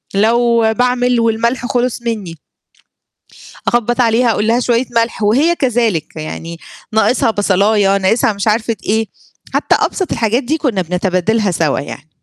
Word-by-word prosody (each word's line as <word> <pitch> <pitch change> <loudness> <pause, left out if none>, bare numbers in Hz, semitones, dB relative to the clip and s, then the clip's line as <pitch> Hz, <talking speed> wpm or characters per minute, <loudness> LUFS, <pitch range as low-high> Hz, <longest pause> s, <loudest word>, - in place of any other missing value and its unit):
لو 235 +3 +3 0.2
باعمل 250 0 +1
والملح 230 +2 0
خلص 245 -1 -1
منّي 210 -8 -4 1.3
أخبّط 240 +1 +1
عليها 230 0 +2
أقول 210 0 -1
لها: 235 +2 +2
"شوية 245 0 +1
ملح." 230 -1 0
وهي 280 +12 +3
كذلك، 230 - -1
يعني 165 +1 -7 0.3
ناقصها 225 +1 +2
بصلاية، 200 0 +2
ناقصها 205 +3 +1
مش 200 +2 -4
عارفة 225 +1 +1
إيه، 220 0 0 0.5
حتّى - - +2
أبسط 375 - -2
الحاجات 230 +3 0
دي 305 +6 -1
كُنّا 240 - -1
بنتبادلها 185 +4 0
سَوا 160 -4 0
يعني. 145 +1 -9
225 Hz, 135 wpm, -15 LUFS, 200-240 Hz, 1.3 s, لو